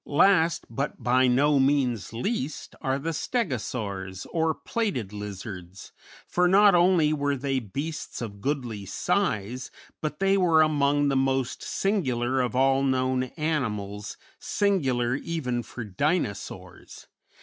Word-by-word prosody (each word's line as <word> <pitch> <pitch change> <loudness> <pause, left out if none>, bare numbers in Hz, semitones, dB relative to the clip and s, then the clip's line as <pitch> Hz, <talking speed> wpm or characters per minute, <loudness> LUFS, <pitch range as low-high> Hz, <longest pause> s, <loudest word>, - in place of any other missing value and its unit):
Last, 165 +2 +3
but 135 +2 -4
by 125 +2 +4
no 140 +3 +4
means 135 -6 +1
least, 140 - -3
are 135 0 0
the 165 +4 -3
Stegosaurs, 105 - -3
or 160 -2 +1
plated 180 - -2
lizards, 95 -3 -8 0.3
for 180 0 +2
not 200 +2 +6
only 175 -3 +4
were 145 -1 0
they 135 0 -1
beasts 140 +8 -5
of 100 -4 -6
goodly 125 -7 -2
size, 125 - -1 0.3
but 150 -1 -3
they 195 0 +3
were 165 -4 +5
among 145 -1 +2
the 135 - +1
most 135 -1 0
singular 130 - 0
of 125 0 -2
all 135 +1 +3
known 130 -1 +1
animals, 105 -10 -2 0.2
singular 130 -12 +1
even 140 -7 -2
for 120 +1 -8
Dinosaurs. 110 - -3
135 Hz, 125 wpm, -26 LUFS, 120-160 Hz, 0.3 s, not